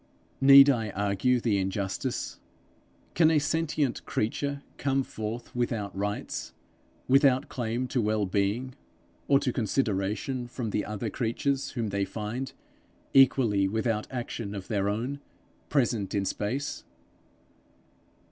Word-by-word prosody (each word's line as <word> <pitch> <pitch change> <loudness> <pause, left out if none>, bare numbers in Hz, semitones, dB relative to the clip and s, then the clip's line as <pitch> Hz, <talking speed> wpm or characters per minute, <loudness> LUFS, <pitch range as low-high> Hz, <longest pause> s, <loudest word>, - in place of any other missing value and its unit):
Need 140 +1 +10
I 115 -6 +2
argue 105 +5 +1
the 110 -4 +1
injustice? 95 0 -3 0.7
Can 160 -2 +5
a 160 - +4
sentient 150 -2 0
creature 140 +6 -2
come 135 -1 +1
forth 110 +1 -6
without 115 -5 -2
rights, 100 +1 -3 0.5
without 135 -1 +4
claim 120 +1 -2
to 125 - +1
well 105 -1 +1
being, 100 +7 -1 0.5
or 140 - +5
to 135 -4 -1
consideration 110 +2 -1
from 120 -2 -4
the 105 - -1
other 105 +1 -4
creatures 135 +3 -1
whom 115 -4 -2
they 100 0 0
find, 110 +6 -4 0.6
equally 125 -7 +5
without 110 +1 -1
action 120 -4 -5
of 95 -2 -7
their 100 -3 +1
own, 120 +7 -2 0.5
present 120 -8 +1
in 100 -1 +1
space? 130 +10 -3
115 Hz, 120 wpm, -28 LUFS, 105-135 Hz, 0.7 s, Need